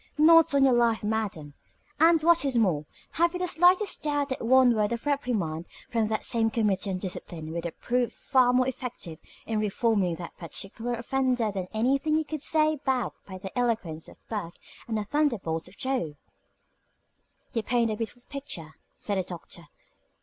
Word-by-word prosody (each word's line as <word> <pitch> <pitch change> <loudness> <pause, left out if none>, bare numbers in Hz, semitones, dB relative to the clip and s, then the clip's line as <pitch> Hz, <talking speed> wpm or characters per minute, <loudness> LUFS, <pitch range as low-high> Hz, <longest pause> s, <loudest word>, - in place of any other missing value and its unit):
Not 325 -1 +6
on 275 - +5
your 265 -2 +5
life, 235 -2 +2
madam. 210 -9 -2 0.5
And, 325 0 +5
what 340 -1 +5
is 270 -3 +1
more, 175 -10 +2 0.3
have 340 +1 +2
you 360 - -3
the 365 - 0
slightest 360 +4 +3
doubt 290 -1 0
that 260 - -3
one 255 +1 +5
word 210 -1 +1
of 235 - -5
reprimand 215 - -1 0.2
from 225 -2 +1
that 215 0 -1
same 225 -1 +2
Committee 210 -3 0
on 185 - -1
Discipline 170 -4 -6
would 170 0 -3
prove 245 0 0
far 255 -2 +2
more 255 0 +3
effective 240 -11 -6 0.3
in 220 -1 -1
reforming 210 -4 +1
that 170 0 -8
particular 220 +7 -4
offender 250 -2 0
than 190 -2 -4
anything 270 +7 +1
you 315 - -1
could 310 -1 -5
say 310 0 +2
backed 260 -4 -1
by 190 -1 -7
the 190 0 -9
eloquence 220 -10 -1
of - - -14
Burke 200 -6 -4 0.3
and 225 -2 -1
the 210 - -1
thunderbolts 205 - -1
of 180 - -16
Jove?" 255 - -2 1.4
"You 230 - 0
paint 235 0 +1
a - - -1
beautiful 230 +2 -6
picture," 180 - -7 0.2
said 200 -2 -2
the - - 0
Doctor. 170 -1 -8
230 Hz, 175 wpm, -27 LUFS, 190-270 Hz, 1.4 s, Not